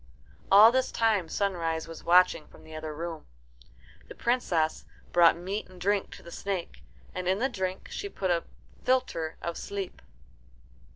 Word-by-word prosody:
All 210 Hz, +4 st, +9 dB
this 260 Hz, +1 st, +1 dB
time 215 Hz, -7 st, +1 dB
Sunrise 165 Hz, -5 st, -1 dB
was 165 Hz, -1 st, -9 dB
watching 180 Hz, -3 st, +4 dB
from -, -, -17 dB
the 160 Hz, 0 st, -11 dB
other 155 Hz, 0 st, -5 dB
room. 165 Hz, +1 st, -6 dB, 0.8 s
The -, -, -10 dB
Princess 180 Hz, -10 st, 0 dB, 0.3 s
brought 170 Hz, -1 st, +6 dB
meat 190 Hz, +5 st, -4 dB
and 185 Hz, -1 st, -15 dB
drink 200 Hz, +2 st, +1 dB
to -, -, -14 dB
the 170 Hz, -, -11 dB
snake, 185 Hz, -, -4 dB, 0.3 s
and 180 Hz, -, -4 dB
in 190 Hz, +1 st, +3 dB
the 250 Hz, +5 st, +1 dB
drink 190 Hz, -6 st, -4 dB
she 405 Hz, -, -4 dB
put 190 Hz, -, -2 dB
a 170 Hz, -1 st, +1 dB, 0.4 s
philtre 250 Hz, -11 st, 0 dB
of 170 Hz, 0 st, -3 dB
sleep. 200 Hz, -2 st, -5 dB
180 Hz, 160 wpm, -28 LUFS, 165-200 Hz, 0.8 s, All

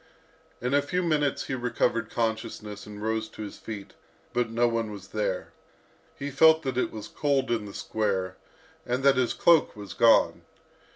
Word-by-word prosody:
In 125 Hz, +2 st, -1 dB
a 145 Hz, -, +5 dB
few 180 Hz, +6 st, -1 dB
minutes 150 Hz, -4 st, +1 dB
he -, -, -4 dB
recovered 120 Hz, -2 st, 0 dB
consciousness, 110 Hz, -2 st, -3 dB
and 105 Hz, 0 st, -8 dB
rose 110 Hz, 0 st, -1 dB
to 110 Hz, -, -8 dB
his 105 Hz, -, -8 dB
feet, 100 Hz, -3 st, -8 dB, 0.4 s
but 120 Hz, -1 st, +1 dB
no 120 Hz, +1 st, +2 dB
one 115 Hz, -2 st, -1 dB
was 100 Hz, -2 st, -10 dB
there. 100 Hz, -3 st, -2 dB, 0.6 s
He 140 Hz, +1 st, -4 dB
felt 160 Hz, +3 st, +6 dB
that 130 Hz, -2 st, -2 dB
it 130 Hz, -, 0 dB
was 110 Hz, -1 st, -7 dB
cold 140 Hz, -4 st, 0 dB
in 110 Hz, -3 st, 0 dB
the 100 Hz, -, -9 dB
square, 95 Hz, -4 st, -1 dB, 0.5 s
and 125 Hz, 0 st, -2 dB
that 140 Hz, -1 st, +6 dB
his 125 Hz, -2 st, +2 dB
cloak 170 Hz, -3 st, +4 dB
was 100 Hz, -2 st, -8 dB
gone. 115 Hz, -1 st, +4 dB
115 Hz, 175 wpm, -27 LUFS, 105-135 Hz, 0.6 s, felt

